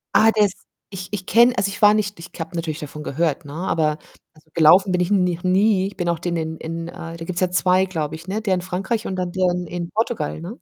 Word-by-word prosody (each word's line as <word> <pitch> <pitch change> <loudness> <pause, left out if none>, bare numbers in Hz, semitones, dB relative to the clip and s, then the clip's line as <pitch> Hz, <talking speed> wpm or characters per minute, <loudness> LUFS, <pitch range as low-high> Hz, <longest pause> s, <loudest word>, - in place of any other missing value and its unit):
Ah, 225 +1 +6
der 215 -1 +4
ist 195 - -4 0.4
ich 185 -1 -6
ich 185 -3 -3
kenne 240 +3 +5
also 200 - +1
ich 200 - -8
war 210 0 +7
nicht 205 -3 -1
ich 165 - -10
habe 165 +1 -6
natürlich 165 -2 -3
davon 150 0 -8
gehört, 155 +1 -1
ne, 140 - -9
aber 155 -3 0 0.4
also, 155 0 -24
gelaufen 175 +4 +6
bin 180 - +1
ich 180 - 0
n 195 -3 +3
noch 175 0 -2
nie. 190 +1 +3
Ich 200 - -9
bin 175 -2 -1
auch 170 - 0
den 175 0 -2
in 160 0 -3
in 165 +1 -5
äh, - - -8 0.2
da 165 - -7
gibt's 175 0 -3
ja 185 - +2
2, 185 +1 +3
glaube 160 -4 -3
ich, 165 +2 -12
ne, 205 +3 -2
der 195 -4 +1
in 180 - -2
Frankreich 190 +5 -3
und 190 - -3
dann 180 -1 -2
der 185 0 +1
in 180 -1 -3
in 175 0 -5
Portugal, 215 -9 -2
ne? 190 +9 -8
180 Hz, 270 wpm, -21 LUFS, 165-195 Hz, 0.4 s, war